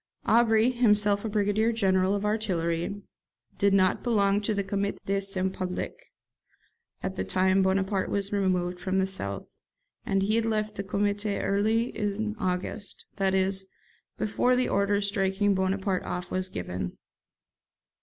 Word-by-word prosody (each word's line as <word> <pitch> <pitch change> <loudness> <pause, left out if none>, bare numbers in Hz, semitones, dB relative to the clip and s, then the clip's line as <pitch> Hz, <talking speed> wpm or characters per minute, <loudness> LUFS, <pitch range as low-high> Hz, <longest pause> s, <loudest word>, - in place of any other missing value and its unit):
Aubry, 225 +1 +4
himself 210 -4 +3
a 220 - -2
brigadier 210 +2 +1
general 190 -3 +2
of 205 0 -2
artillery, 195 -3 -1 0.6
did 200 0 +4
not 185 -1 +3
belong 205 -4 +2
to 210 +1 -1
the 200 - 0
'Comité 200 +1 -2
de 195 0 0
Salut 190 -1 -1
Public' 180 -1 -5 0.9
at - - -3
the 95 - -1
time 190 - +2
Bonaparte 190 +1 +1
was 200 0 -1
removed 180 -3 0
from 190 +1 -1
the 190 - +3
south; 100 - -4 0.6
and 195 0 0
he 215 +3 +2
had 230 - +1
left 215 -1 -1
the 200 - -4
Comité 205 +1 -1
early 220 +4 +1
is 205 -1 -2 0.2
August, 185 +2 -3
that 190 -1 +1
is, 190 0 +1 0.5
before 245 +4 +1
the 250 0 +1
order 200 +1 +1
striking 200 0 +1
Bonaparte 190 0 0
off 180 0 -5
was 185 0 -1
given. 90 - -5
200 Hz, 145 wpm, -27 LUFS, 190-210 Hz, 0.9 s, Aubry